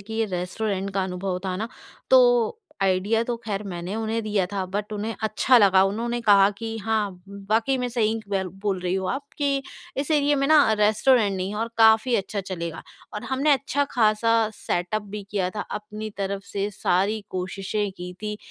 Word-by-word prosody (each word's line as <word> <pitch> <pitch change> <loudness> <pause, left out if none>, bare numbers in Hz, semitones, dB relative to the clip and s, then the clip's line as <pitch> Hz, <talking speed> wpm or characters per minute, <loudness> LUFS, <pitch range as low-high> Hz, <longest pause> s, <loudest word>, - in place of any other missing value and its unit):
कि 220 +3 -8
ये 225 0 +1
रेस्टोरेंट 195 +2 -2
का 195 - +1
अनुभव 180 0 -3
था 185 -1 -2
ना, 220 +3 -3 0.4
तो - - +5 0.2
आईडिया 195 +4 +2
तो 240 -1 -2
ख़ैर 210 -2 -3
मैंने 180 +1 -5
उन्हें 225 0 -1
दिया 210 -3 0
था 195 -2 -1
बट 210 +1 -2
उन्हें 215 +2 -3
अच्छा 220 +4 +3
लगा। 190 -2 +6
उन्होंने 235 +4 -1
कहा 200 -3 +6
कि, 225 -1 -4
"हाँ, 215 -1 0 0.2
व 200 0 -10
वाक़ई 230 +5 +2
मैं 250 - -1
सही 225 -3 +1
क - - -15
वैल 190 -1 0 0.2
बोल 195 -2 +1
रही 180 0 -1
हो 190 -1 -1
आप 275 +8 -2
कि 280 -2 +1 0.4
इस 285 +3 -2
एरिया 290 -1 +3
में 275 0 +1
ना 295 -7 +5
रेस्टोरेंट 210 -1 +3
नहीं 185 +1 -2
है 210 - -5
और 230 - -1
काफ़ी 225 +2 +5
अच्छा 200 +1 -2
चलेगा।" 170 -3 -5 0.3
और 210 - -5
हमने 280 +3 +3
अच्छा-ख़ासा 230 -5 +2 0.2
सेटअप 195 +4 -2
भी 205 0 -7
किया 190 -3 0
था - - -1 0.2
अपनी 215 +1 -7
तरफ़ 195 0 -3
से 200 0 -1
सारी 200 +2 0
कोशिशें 195 +3 -2
की 180 0 -7
थीं, 210 0 -3
210 Hz, 190 wpm, -24 LUFS, 195-230 Hz, 0.4 s, लगा